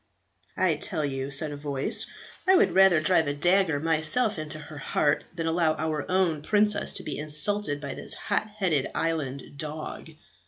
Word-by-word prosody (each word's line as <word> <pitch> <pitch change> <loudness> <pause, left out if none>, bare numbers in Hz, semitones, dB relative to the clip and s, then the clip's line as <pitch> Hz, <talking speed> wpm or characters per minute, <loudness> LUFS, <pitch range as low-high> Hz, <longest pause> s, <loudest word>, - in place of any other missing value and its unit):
"I - - +2
tell 155 -6 -2
you," 135 -1 -3
said 145 +2 -1
a - - -5
voice, 140 -2 -3 0.4
"I 380 - +7
would 385 - +4
rather 190 -3 +6
drive 160 -2 +3
a 145 - -1
dagger 175 0 +2
myself 165 +7 +1
into 155 0 -5
her 150 0 -10
heart, 145 +2 0
than 165 -2 -3
allow 165 -1 +2
our 155 -2 -3
own 180 -5 +1
princess 210 +5 +2
to - - -3
be 145 - -5
insulted 150 +2 +2
by 140 -2 -5
this - - -2
hot - - -1
headed 190 -10 -1
island 145 -5 -2
dog." 155 +1 -6
155 Hz, 170 wpm, -27 LUFS, 145-185 Hz, 0.4 s, I